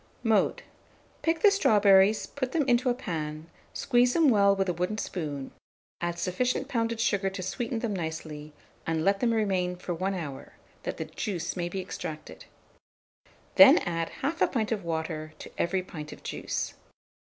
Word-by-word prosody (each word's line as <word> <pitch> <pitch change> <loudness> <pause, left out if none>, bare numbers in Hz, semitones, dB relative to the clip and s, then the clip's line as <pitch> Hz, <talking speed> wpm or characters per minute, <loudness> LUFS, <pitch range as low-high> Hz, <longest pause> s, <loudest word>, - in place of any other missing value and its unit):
Mode. 220 -4 +2 0.6
Pick 325 0 0
the 415 - +8
strawberries, 205 - +5
put 260 -2 -4
them 300 -5 +1
into 245 0 +3
a - - +3
pan, 155 -9 -4 0.3
squeeze 245 -1 +2
them 325 -4 +5
well 200 -4 +5
with 195 0 0
a 180 - +1
wooden 180 +5 -2
spoon, 145 -10 -4 0.5
add 175 0 -2
sufficient 250 +10 -1
pounded 230 -3 -1
sugar 200 -4 +1
to 190 -1 -6
sweeten 230 +5 -3
them 225 -2 -2
nicely, 160 -3 -5 0.4
and 160 -1 0
let 195 0 +3
them 235 +1 +2
remain 190 -5 0
for 180 0 -5
1 190 +3 -1
hour, 150 -7 -7 0.3
that - - -4
the - - -3
juice 180 -6 -4
may 175 -2 -2
be 190 - -4
extracted; 155 -4 -7 1.1
then 285 +3 +10
add 165 -1 -1
1/2 325 +5 +1
pint 225 -4 -1
of 215 -4 -1
water 160 -1 -3
to - - -10
every 185 +2 +1
pint 155 -4 -8
of - - -12
juice. - - -3
195 Hz, 165 wpm, -28 LUFS, 170-235 Hz, 1.1 s, then